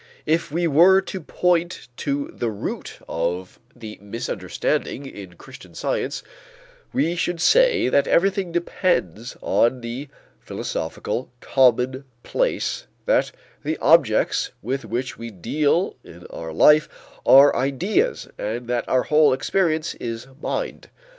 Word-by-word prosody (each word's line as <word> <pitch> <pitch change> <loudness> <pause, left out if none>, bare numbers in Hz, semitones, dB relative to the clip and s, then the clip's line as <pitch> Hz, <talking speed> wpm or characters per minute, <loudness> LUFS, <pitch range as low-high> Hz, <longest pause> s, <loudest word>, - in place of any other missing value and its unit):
If 160 -1 0
we 170 +3 0
were 170 +5 +6
to 190 -1 -6
point 175 +2 0
to 140 0 -2
the 120 - -2
root 105 -2 -5
of 90 +2 -3 0.2
the 110 -3 -10
misunderstanding 115 +5 -3
in 95 -9 -10
Christian - - -14
Science, - - -2 0.7
we 175 -10 0
should 175 0 -2
say 470 - +4
that 140 - +2
everything 190 0 +2
depends 170 - -1
on 120 +2 +2
the 120 +4 -6 0.3
philosophical 130 - -4
commonplace 130 - 0 0.2
that - - +2 0.3
the 155 +2 -2
objects 145 -8 +3
with 130 +3 -3
which 120 +4 -4
we 115 0 -6
deal 145 - 0
in 85 +1 -14
our 80 -1 -7
life 150 - +5 0.3
are 140 +2 +7
ideas 185 - 0
and 115 +3 -4
that 120 -1 -2
our 130 -1 +3
whole 150 -2 +4
experience 160 +3 0
is 115 0 -6 0.2
mind. - - -4
140 Hz, 120 wpm, -22 LUFS, 115-170 Hz, 0.7 s, are